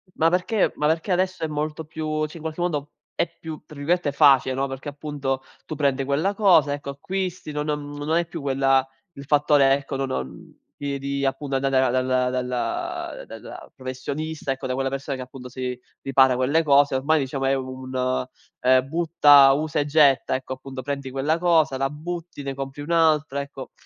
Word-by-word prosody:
ma 165 Hz, +1 st, +3 dB
perché 185 Hz, +4 st, +1 dB
ma 150 Hz, -, +1 dB
perché 165 Hz, +4 st, 0 dB
adesso 185 Hz, -1 st, 0 dB
è -, -, +1 dB
molto 150 Hz, +1 st, -3 dB
più 155 Hz, 0 st, -2 dB
sì, 165 Hz, -, -11 dB
in 160 Hz, -, -11 dB
qualche 160 Hz, +2 st, -4 dB
modo, 150 Hz, -5 st, -2 dB, 0.2 s
è -, -, 0 dB
più, 160 Hz, -2 st, -7 dB
tra 150 Hz, -, -13 dB
virgolette, 155 Hz, +1 st, 0 dB
"facile", 135 Hz, -3 st, +5 dB
no, 135 Hz, +1 st, 0 dB
perché, 135 Hz, +2 st, -6 dB
appunto, 140 Hz, -2 st, -3 dB, 0.2 s
tu 155 Hz, -, -5 dB
prendi 140 Hz, -2 st, +1 dB
quella 155 Hz, +9 st, +1 dB
cosa, 180 Hz, -9 st, +4 dB
ecco, 145 Hz, -1 st, -5 dB
acquisti, 185 Hz, +2 st, -4 dB
no 150 Hz, 0 st, -2 dB
non 150 Hz, -1 st, -3 dB
non 145 Hz, +1 st, -6 dB
hai 170 Hz, +1 st, +2 dB
più 165 Hz, -1 st, -7 dB
quella 135 Hz, -1 st, +2 dB, 0.3 s
il 140 Hz, -1 st, -10 dB
fattore, 145 Hz, -1 st, +4 dB
ecco, 140 Hz, 0 st, -2 dB
no 135 Hz, -, -1 dB
non 65 Hz, -, -6 dB, 0.2 s
di 140 Hz, -1 st, -3 dB
di, 140 Hz, 0 st, -2 dB
appunto, 135 Hz, 0 st, -2 dB
andare 130 Hz, -1 st, +2 dB
dalla 130 Hz, 0 st, +1 dB
dalla 345 Hz, -, -3 dB
dalla -, -, -10 dB
professionista, 140 Hz, +3 st, -4 dB
ecco, 135 Hz, 0 st, -6 dB
da 130 Hz, -, -1 dB
quella 135 Hz, 0 st, -1 dB
persona 135 Hz, 0 st, -4 dB
che, 130 Hz, -, -5 dB
appunto, 125 Hz, 0 st, -10 dB
si 125 Hz, 0 st, -4 dB, 0.2 s
ripara 130 Hz, -1 st, +4 dB
quelle 145 Hz, +6 st, +2 dB
cose. 140 Hz, -2 st, +4 dB
Ormai, 155 Hz, +4 st, +2 dB
diciamo, 135 Hz, 0 st, -2 dB
è 135 Hz, -, +3 dB
un, 130 Hz, -1 st, -2 dB, 0.4 s
ehm, 130 Hz, +1 st, +4 dB
butta, 150 Hz, -4 st, +6 dB
usa 150 Hz, +1 st, -1 dB
e 145 Hz, -, +1 dB
getta. 145 Hz, -3 st, +4 dB
Ecco, 130 Hz, 0 st, -4 dB
appunto, 130 Hz, 0 st, -8 dB
prendi 140 Hz, -1 st, -4 dB
quella 145 Hz, +5 st, 0 dB
cosa, 165 Hz, -5 st, +3 dB
la 135 Hz, 0 st, 0 dB
butti, 165 Hz, 0 st, -6 dB
ne 135 Hz, -, -3 dB
compri 135 Hz, +1 st, -6 dB
un'altra, 155 Hz, -3 st, +2 dB
ecco. 140 Hz, -2 st, -9 dB
140 Hz, 190 wpm, -24 LUFS, 135-155 Hz, 0.4 s, butta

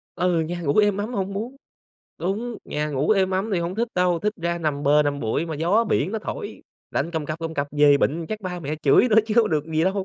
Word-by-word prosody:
Ừ, 175 Hz, -2 st, +1 dB
nhà 175 Hz, +2 st, -3 dB
ngủ 145 Hz, -2 st, 0 dB
êm 205 Hz, -2 st, +4 dB
ấm 215 Hz, +4 st, -3 dB
hông 195 Hz, -1 st, -2 dB
muốn 230 Hz, +7 st, -5 dB, 0.6 s
đúng, 215 Hz, +6 st, -3 dB
nhà 150 Hz, 0 st, -2 dB
ngủ 140 Hz, +5 st, 0 dB
êm 190 Hz, -3 st, +3 dB
ấm 190 Hz, +4 st, -1 dB
thì 185 Hz, -, +2 dB
hông 170 Hz, +2 st, -3 dB
thích 235 Hz, +3 st, -1 dB
đâu, 180 Hz, -1 st, +2 dB
thích 210 Hz, +4 st, -1 dB
ra 170 Hz, 0 st, -1 dB
nằm 150 Hz, -3 st, -2 dB
bờ 150 Hz, +1 st, +4 dB
nằm 145 Hz, -1 st, -2 dB
bụi 115 Hz, +9 st, -1 dB
mà 160 Hz, -, -4 dB
gió 180 Hz, +10 st, +2 dB
biển 200 Hz, -1 st, 0 dB
nó 220 Hz, -, -1 dB
thổi, 415 Hz, -, -6 dB, 0.3 s
lạnh 170 Hz, -, -1 dB
cầm 160 Hz, -3 st, -3 dB
cập 155 Hz, +1 st, -4 dB
cầm 165 Hz, -1 st, -5 dB
cập 140 Hz, 0 st, -1 dB
về 145 Hz, -1 st, +5 dB
bệnh 160 Hz, +4 st, 0 dB
chắc 215 Hz, 0 st, -4 dB
ba 180 Hz, -2 st, -5 dB
mẹ 150 Hz, -1 st, -3 dB
chửi 145 Hz, -, +5 dB
nữa 220 Hz, -, +3 dB
chứ 215 Hz, -, -2 dB
không 230 Hz, -4 st, +4 dB
được 150 Hz, -2 st, 0 dB
gì 160 Hz, +1 st, 0 dB
đâu. 190 Hz, 0 st, 0 dB
175 Hz, 265 wpm, -23 LUFS, 155-205 Hz, 0.6 s, về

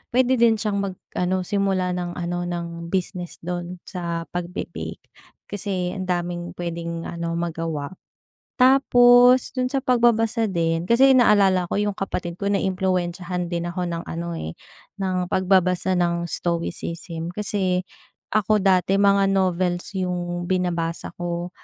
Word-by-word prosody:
pwede 255 Hz, 0 st, +4 dB
din 230 Hz, -1 st, +5 dB
siyang 210 Hz, -2 st, -1 dB
mag-ano 185 Hz, -1 st, -2 dB
simula 190 Hz, -1 st, 0 dB
ng 175 Hz, -1 st, -4 dB
ano 175 Hz, 0 st, -3 dB
ng 170 Hz, -1 st, -5 dB
business 180 Hz, -1 st, -2 dB
dun 175 Hz, +1 st, -4 dB
sa 170 Hz, -3 st, -4 dB
pagbe-bake. 175 Hz, +1 st, -5 dB, 0.4 s
Kasi 190 Hz, -3 st, -2 dB
ang 185 Hz, -1 st, -5 dB
daming 175 Hz, -1 st, -3 dB
pwedeng 170 Hz, -1 st, -4 dB
ano 170 Hz, 0 st, -4 dB
magawa. 165 Hz, -3 st, -3 dB, 0.7 s
Tapos 250 Hz, -1 st, +6 dB
dun 255 Hz, -1 st, -1 dB
sa 275 Hz, -, +1 dB
pagbabasa 235 Hz, -3 st, +2 dB
din, 165 Hz, -2 st, 0 dB
kasi 260 Hz, +7 st, +5 dB
naalala 200 Hz, -6 st, +5 dB
ko -, -, +1 dB
yung 205 Hz, -1 st, 0 dB
kapatid 180 Hz, -3 st, -4 dB
ko 200 Hz, +2 st, -2 dB
naimpluwensyahan 180 Hz, -2 st, -1 dB
din 170 Hz, -1 st, -2 dB
ako 180 Hz, 0 st, -2 dB
ng 170 Hz, 0 st, -4 dB
ano, 170 Hz, 0 st, -5 dB
eh, 80 Hz, -, -5 dB, 0.5 s
ng 185 Hz, -1 st, -1 dB
pagbabasa 185 Hz, -1 st, +2 dB
ng 170 Hz, -1 st, 0 dB
stoicism 170 Hz, 0 st, -3 dB
kasi 185 Hz, -2 st, -1 dB, 0.5 s
ako 215 Hz, 0 st, +3 dB
dati 185 Hz, -1 st, +3 dB
mga 200 Hz, 0 st, +4 dB
novels 185 Hz, 0 st, 0 dB
yung 175 Hz, -1 st, -2 dB
binabasa 175 Hz, -2 st, -1 dB
ko. 175 Hz, 0 st, -3 dB
180 Hz, 130 wpm, -23 LUFS, 170-200 Hz, 0.7 s, Tapos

